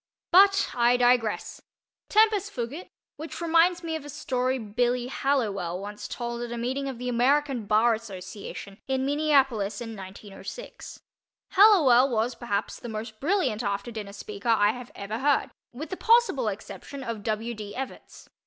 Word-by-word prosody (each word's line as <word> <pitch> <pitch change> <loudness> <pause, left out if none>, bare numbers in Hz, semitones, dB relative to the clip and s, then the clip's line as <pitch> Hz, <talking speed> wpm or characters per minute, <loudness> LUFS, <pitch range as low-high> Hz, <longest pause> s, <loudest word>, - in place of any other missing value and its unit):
But 390 +2 +6
I 240 0 +3
digress. 245 -3 +1 0.5
Tempus 425 -2 +3
fugit,—which 295 - -8
reminds 340 +1 +3
me 325 -1 -3
of 315 - -5
a 290 - -9
story 260 -2 -1
"Billy" 240 +2 0
Hallowell 205 -12 -1
once 205 +1 -7
told 235 -1 -4
at 240 -1 -5
a 240 - -4
meeting 260 +4 -2
of 260 - -6
the 250 +1 -5
American 250 -1 +1
Bar 220 +3 +4
Association 200 -1 -8
in 265 0 0
Minneapolis, 270 -8 +2
in 225 -2 -6
1906. 200 - -9 0.5
Hallowell 305 - +6
was 235 +1 0
perhaps 205 -4 -3
the 240 - -7
most 220 0 -6
brilliant 285 - +1
after 200 +1 -3
dinner 210 -3 -7
speaker 205 +2 -6
I 210 -2 +4
have 245 +1 -9
ever 210 +3 -5
heard—with 285 +1 -2
the 375 - -3
possible 455 - +3
exception 220 +6 -6
of 230 -4 -4
W. 220 +2 -2
D. 210 -2 -8
Evarts. 265 0 -8
245 Hz, 150 wpm, -26 LUFS, 215-280 Hz, 0.5 s, But